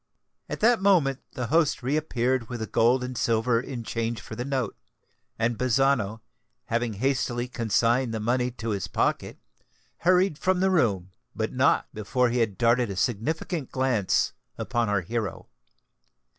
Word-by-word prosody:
At -, -, -5 dB
that 230 Hz, -1 st, +4 dB
moment 165 Hz, -9 st, +3 dB
the 125 Hz, -, -3 dB
host 160 Hz, -5 st, +2 dB
re 135 Hz, +4 st, 0 dB
appeared 130 Hz, -5 st, 0 dB
with 120 Hz, -1 st, -5 dB
the 110 Hz, -, -2 dB
gold 120 Hz, +4 st, +2 dB
and 125 Hz, 0 st, -5 dB
silver 115 Hz, +1 st, +1 dB
in 125 Hz, -2 st, -6 dB
change 115 Hz, 0 st, -2 dB
for 110 Hz, -, -9 dB
the 120 Hz, -, -3 dB
note; 130 Hz, -5 st, -2 dB, 0.6 s
and 115 Hz, 0 st, 0 dB
Bazzano, 125 Hz, -4 st, +1 dB, 0.4 s
having 115 Hz, 0 st, -1 dB
hastily 125 Hz, +1 st, -1 dB
consigned 120 Hz, +1 st, +1 dB
the 110 Hz, -, -3 dB
money 125 Hz, +3 st, +1 dB
to 115 Hz, -2 st, -6 dB
his 100 Hz, -4 st, -2 dB
pocket, -, -, -1 dB, 0.6 s
hurried 180 Hz, -2 st, +2 dB
from 185 Hz, -1 st, +1 dB
the 190 Hz, +1 st, +2 dB
room,—but 95 Hz, -, -1 dB
not -, -, +2 dB
before 115 Hz, +4 st, 0 dB
he 125 Hz, -, 0 dB
had 110 Hz, -5 st, 0 dB
darted 120 Hz, +1 st, +3 dB
a 100 Hz, -, -4 dB
significant 130 Hz, -, -2 dB
glance 130 Hz, -7 st, +1 dB, 0.2 s
upon 120 Hz, -4 st, -1 dB
our 100 Hz, -2 st, +1 dB
hero. 105 Hz, 0 st, -4 dB
120 Hz, 155 wpm, -26 LUFS, 115-135 Hz, 0.6 s, that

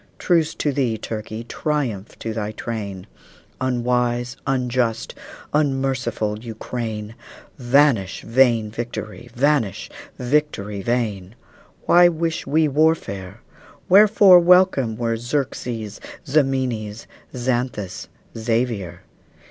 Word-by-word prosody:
Truce 165 Hz, -3 st, +1 dB
to 145 Hz, -, 0 dB
thee, 130 Hz, -5 st, 0 dB
Turkey! 110 Hz, +1 st, -6 dB
Triumph 120 Hz, -6 st, -3 dB
to 115 Hz, -, -4 dB
thy 110 Hz, -1 st, -3 dB
train, 100 Hz, -5 st, -5 dB, 0.6 s
Unwise, 125 Hz, -1 st, 0 dB
unjust, 125 Hz, -3 st, -1 dB, 0.4 s
unmerciful 135 Hz, -7 st, 0 dB
Ukraine! 110 Hz, -1 st, -5 dB, 0.5 s
Vanish 120 Hz, -6 st, +2 dB
vain 115 Hz, -3 st, +3 dB
victory! 120 Hz, 0 st, -6 dB
vanish, 135 Hz, -6 st, 0 dB, 0.3 s
victory 125 Hz, -7 st, -1 dB
vain! 105 Hz, -3 st, -2 dB, 0.5 s
Why 175 Hz, 0 st, +7 dB
wish 165 Hz, 0 st, -2 dB
we 155 Hz, +1 st, +3 dB
warfare? 145 Hz, -, 0 dB, 0.5 s
Wherefore 200 Hz, -1 st, +7 dB
welcome 175 Hz, -, +4 dB
were 115 Hz, -1 st, -1 dB
Xerxes, 120 Hz, -4 st, -3 dB, 0.2 s
Ximenes, 130 Hz, -7 st, 0 dB, 0.3 s
Xanthus, 120 Hz, -6 st, -2 dB, 0.3 s
Xavier? 115 Hz, -6 st, -2 dB
120 Hz, 90 wpm, -21 LUFS, 110-140 Hz, 0.6 s, Why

